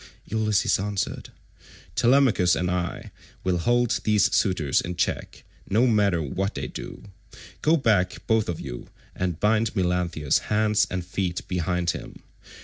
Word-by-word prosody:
Ulysses 110 -3 +1
answered, 100 0 -3 0.6
"Telemachus 120 -8 +4
and 90 +1 -1
I 90 -1 -3 0.3
will 90 -2 +1
hold 120 +5 +2
these 105 -1 +3
suitors 80 -8 +2
in 90 0 -5
check, 90 - -2 0.3
no 110 +6 +3
matter 100 -8 +2
what 95 +8 -3
they - - -3
do; - - -8 0.6
go 160 +2 +4
back 105 - +1
both 110 -3 +1
of 85 - -3
you - - -7 0.3
and 90 -3 -2
bind 110 +2 +1
Melanthius' 90 -5 +1
hands 105 0 +2
and 90 -1 -3
feet 90 -1 -3
behind 90 -1 0
him. - - -9
95 Hz, 140 wpm, -25 LUFS, 90-110 Hz, 0.6 s, Telemachus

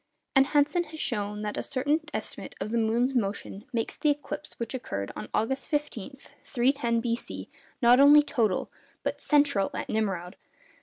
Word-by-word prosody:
And 270 0 +6
Hansen 295 +5 +2
has 315 0 -10
shown 210 -3 -2
that 210 0 -3
a - - 0
certain 285 +4 +1
estimate - - -5
of 215 - -4
the 235 - +1
moon's 235 +4 +2
motion 205 -3 -2
makes 230 -2 -2
the 300 - +2
eclipse 290 +1 -3
which 235 +1 -4
occurred 100 - -4
on 105 0 -6
August 265 +5 0
15, 290 -5 -3 0.3
310 240 -2 +1
B.C., 235 +1 -4 0.3
not 240 +2 +7
only 290 +1 +8
total, 225 -9 0 0.3
but - - -2
central 285 -10 +3
at - - -4
Nimroud. 195 -4 -2
240 Hz, 160 wpm, -28 LUFS, 215-285 Hz, 0.3 s, only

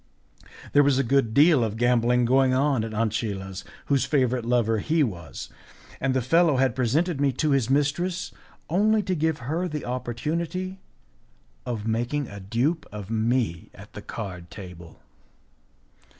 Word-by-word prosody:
There 145 - +7
was 140 -2 +3
a 135 - +2
good 135 -2 +2
deal 145 +1 +5
of 110 -1 -2
gambling 120 0 +3
going 130 +1 +3
on 135 -3 +2
at 115 - -5
Ancilla's, 105 -4 -2 0.2
whose 140 -4 +2
favourite 130 -3 +1
lover 115 -2 +2
he 155 +7 +2
was, 85 - -5 0.5
and 130 -1 0
the 130 - +1
fellow 165 +2 +3
had 130 0 +2
presented 140 +5 0
me 140 -1 +3
to 150 +4 0
his 135 -4 +2
mistress 160 +6 0 0.4
only 210 +5 +2
to 185 -1 -1
give 160 -2 0
her 165 +7 -1
the 150 -3 -5
opportunity 165 +10 -3 0.9
of 115 -4 -3
making 120 +5 -1
a 100 - -8
dupe 120 - -1
of 105 0 -7
me 110 -5 0
at - - -14
the - - -8
card 90 -6 -7
table. 90 -4 -11
130 Hz, 150 wpm, -25 LUFS, 115-150 Hz, 0.9 s, There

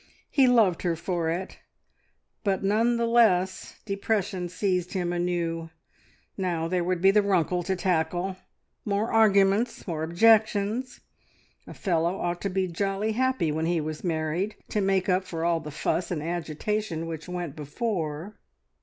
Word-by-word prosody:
He 270 -3 +5
loved 220 -8 +4
her 175 -2 0
for 170 -1 -2
it, 175 +3 -4 0.8
but 195 -2 0
none 225 +4 +2
the 235 - +1
less 215 -6 +2
depression 195 -3 -1
seized 180 0 -1
him 175 -2 -1
anew. 170 -2 -2 0.7
Now 175 -4 -1
there 180 0 0
would 180 0 -1
be 195 - +7
the 210 +1 +4
Runkle 180 -3 +1
to 190 +2 -1
tackle! 180 +1 0 0.5
More 205 +2 -1
arguments! 210 +1 +3
More 165 -4 -3
objections! 215 +6 +2 0.7
A - - -9
fellow 170 0 0
ought 175 0 -2
to 200 - -1
be 190 0 0
jolly 195 +4 -1
happy 255 -8 +1
when 160 +2 -1
he 170 -1 +1
was 155 0 -5
married, 165 +4 -1
to 210 - 0
make 195 -1 +1
up 185 0 +2
for 165 -3 -4
all 170 -1 +2
the 150 - -8
fuss 160 +4 -1
and 155 -4 -3
agitation 170 +2 -2
which 165 +1 -6
went 175 -5 -4
before... 160 +2 -3
180 Hz, 155 wpm, -26 LUFS, 165-205 Hz, 0.8 s, be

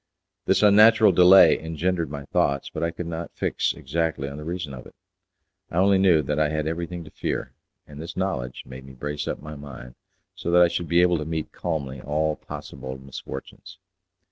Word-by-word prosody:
This - - +2
unnatural 110 +2 +7
delay 90 +2 +7
engendered 80 +1 -2
many 70 -1 -7
thoughts, 70 0 0
but 80 - -5
I 85 - +1
could 85 +1 -6
not 85 0 -5
fix - - 0
exactly 80 0 -2
on 70 +1 -7
the 75 - -7
reason 85 -3 -5
of 60 - -9
it. - - -18 0.7
I - - -8
only 95 +1 +4
knew 90 -5 +4
that 75 +2 -2
I 75 -1 +2
had 75 0 -2
everything 85 +2 -4
to 80 - -13
fear, - - -4 0.3
and 75 0 -10
this 85 - -8
knowledge 80 -11 -3
made 65 0 -10
me 65 0 -12
brace 75 +3 -5
up - - -4
my 75 0 -7
mind 60 -4 -10 0.4
so - - -5
that 90 +1 +5
I 85 - +4
should 85 0 -3
be 85 +3 +4
able 90 -2 +2
to 75 - -4
meet 80 -1 -4
calmly 70 -6 -4
all 75 +3 -1
possible 65 -2 -8
misfortunes. 70 +6 -9
80 Hz, 195 wpm, -24 LUFS, 70-85 Hz, 0.7 s, unnatural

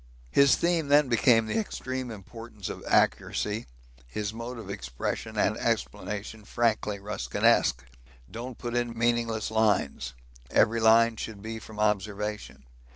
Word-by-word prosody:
His 140 -1 +6
theme 170 -3 +1
then 145 -1 +5
became 115 -1 +4
the 110 - -1
extreme 130 - -4
importance 110 -1 -8
of - - -7
accuracy, 105 -3 +1 0.4
his 105 - -4
mode 115 +2 -6
of 110 -4 -8
expression 65 - -4
and - - +2
explanation 105 +1 -3
frankly 110 -2 0
Ruskinesque. 65 -9 +1 0.5
Don't 120 +1 -7
put 120 -1 -4
in 120 -1 -1
meaningless 115 -2 0
lines 105 - +1 0.3
every 115 +1 +3
line 115 0 +5
should 105 -3 -6
be 110 0 -5
from 110 -1 -11
observation. 105 -6 -2
110 Hz, 130 wpm, -28 LUFS, 105-120 Hz, 0.5 s, His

